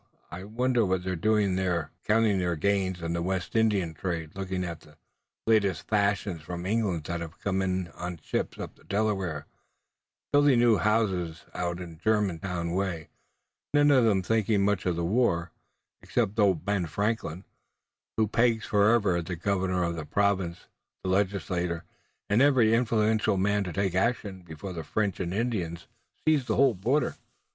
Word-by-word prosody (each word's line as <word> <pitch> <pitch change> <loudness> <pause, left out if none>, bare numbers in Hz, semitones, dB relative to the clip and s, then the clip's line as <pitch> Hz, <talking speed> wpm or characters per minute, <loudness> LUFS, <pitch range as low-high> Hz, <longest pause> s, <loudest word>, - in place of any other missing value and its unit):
I 90 +2 -7
wonder 120 +3 +1
what 95 -2 0
they're 95 0 -2
doing 105 +1 +2
there!" 90 -4 -1 0.2
"Counting 105 -2 +3
their 90 -1 0
gains 95 0 0
in 85 0 -2
the 85 - -1
West 95 +2 -2
India 105 -7 +2
trade, 80 -2 -4
looking 95 -1 -3
at 85 -2 -5
the 75 0 -20 0.5
latest 105 -4 +2
fashions 100 -4 0
from 85 +2 -6
England 100 -6 0
that 85 +2 -4
have 85 +1 -7
come 95 -1 -1
on 95 -1 -1
the 90 0 -7
ships - - -2
up - - -6
the - - -22
Delaware, 95 -7 -1 0.9
building 145 -3 +5
new 120 -2 +5
houses 95 -5 0
out 85 -1 -2 0.3
Germantown 90 -5 0
way, 90 -4 -2 0.7
none 145 0 +5
of 130 -3 +5
them 100 -4 +3
thinking 105 -1 +2
much 100 -3 0
of 90 - +1
the 85 0 -1
war, 90 -5 +1 0.5
except 105 +3 -1
old 95 -6 +3
Ben 100 -4 0
Franklin, 100 -1 -2 0.7
who 110 -1 +3
pegs 115 +1 +2
forever 105 -3 +3
at 85 -1 -4
the 90 - -3
governor 95 0 0
of 85 0 -1
the 80 - -4
Province, 95 0 0 0.4
the 95 - -2
Legislature, 90 -3 -1 0.4
and 105 +4 +3
every 130 -6 +5
influential 110 -3 +2
man 105 +2 +1
to 90 - -4
take 95 +1 -1
action 100 -1 -1
before 85 +2 -8
the 80 -2 -5
French 100 +5 -1
and 90 -2 -2
Indians 95 -6 -2 0.4
seize 155 -5 +3
the 110 -3 0
whole 135 -1 +4
border." 125 +9 0
95 Hz, 165 wpm, -28 LUFS, 85-110 Hz, 0.9 s, building